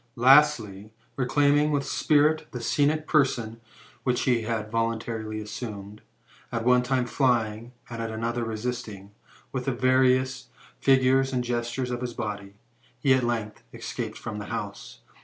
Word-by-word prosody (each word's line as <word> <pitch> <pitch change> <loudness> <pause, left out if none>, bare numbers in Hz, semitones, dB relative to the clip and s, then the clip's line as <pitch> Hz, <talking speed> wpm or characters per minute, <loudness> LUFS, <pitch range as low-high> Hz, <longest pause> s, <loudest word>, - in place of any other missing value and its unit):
Lastly, 120 -6 +4 0.2
reclaiming 145 +3 +3
with 145 -2 0
spirit 155 +1 +2
the 125 - -4
scenic 150 +6 +1
person 120 -7 +1 0.4
which 125 -2 +1
he 120 -3 +2
had 110 -1 -3
voluntarily 115 -1 -2
assumed, 105 -1 -7 0.5
at 115 0 -3
one 125 0 +5
time 125 0 0
flying, 120 -3 0 0.2
and 115 -1 -6
at 115 - -3
another 115 +2 -2
resisting, 110 -3 -5 0.4
with 130 -2 -3
the 135 - +1
various 130 0 +2 0.3
figures 135 0 +3
and 125 -1 -1
gestures 120 +1 -2
of 120 0 -3
his 125 -1 -4
body, 100 -3 -5 0.4
he 135 -2 +4
at 130 - +3
length 115 -3 -2
escaped - - -5
from 105 -1 -6
the 105 - -6
house. - - -6
120 Hz, 140 wpm, -26 LUFS, 110-130 Hz, 0.5 s, one